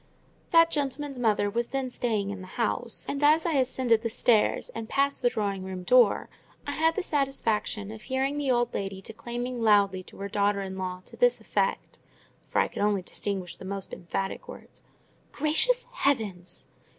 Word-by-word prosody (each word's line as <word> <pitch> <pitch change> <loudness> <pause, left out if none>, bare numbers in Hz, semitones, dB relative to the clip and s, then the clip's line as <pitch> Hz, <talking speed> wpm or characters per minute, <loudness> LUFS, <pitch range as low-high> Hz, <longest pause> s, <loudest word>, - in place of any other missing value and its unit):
That 330 0 +6
gentleman's 280 -2 -2
mother 215 -3 +2
was 235 +3 -1
then 270 -2 -3
staying 215 -5 -1
in 200 -2 -6
the 185 - -9
house; 235 0 -1
and, 280 +1 -2
as 310 +2 +5
I 340 - +1
ascended 255 -4 +2
the 230 - -2
stairs 225 -1 +2
and 225 0 -7
passed 280 0 +1
the 245 - +4
drawing 200 -4 -2
room 185 -1 -6
door, 240 +2 +4 0.4
I 285 - -3
had 320 +2 +2
the 400 - -1
satisfaction 225 - -1
of 220 -1 -9
hearing 265 +3 -1
the 285 -2 -1
old 240 -1 +2
lady 195 -1 -3
declaiming 240 +3 -5
aloud 200 -4 +3
to - - -14
her 200 - -4
daughter 200 0 +1
in 190 0 -6
law 185 -1 -5
to - - -10
this - - +3
effect 485 - -2 0.5
(for - - 0
I - - +3
could - - -6
only 205 -2 +1
distinguish 190 -1 -4
the - - -11
most 195 0 -5
emphatic 195 +3 -4
words)— - - -12 0.5
"Gracious 320 - +3
heavens! 200 -10 -1
230 Hz, 180 wpm, -27 LUFS, 200-275 Hz, 0.5 s, That